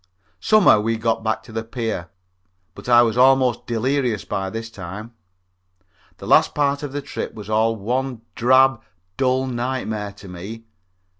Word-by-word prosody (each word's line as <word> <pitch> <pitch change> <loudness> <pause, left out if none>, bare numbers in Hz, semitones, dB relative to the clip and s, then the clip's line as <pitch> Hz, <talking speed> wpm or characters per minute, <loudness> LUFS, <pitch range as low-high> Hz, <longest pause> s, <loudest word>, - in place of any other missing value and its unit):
Somehow 215 - +5
we 115 +2 -1
got 115 0 -1
back 110 0 -1
to 110 - -14
the 110 0 -3
pier, 115 -6 -4 0.6
but - - -9
I 120 0 +7
was 115 0 0
almost 130 -2 +4
delirious 120 -1 -1
by 95 0 -3
this 115 +3 -6
time. 100 +4 -8 1.0
The - - -10
last - - +4
part 140 -1 +1
of 145 -2 -5
the 145 0 -4
trip - - -6
was 105 -1 -8
all 110 +1 +2
one 125 +3 -3
drab, 130 0 +4 0.3
dull 130 0 +1
nightmare 120 -5 -3
to 100 0 -13
me. 95 +6 -8
115 Hz, 155 wpm, -21 LUFS, 110-130 Hz, 1.0 s, I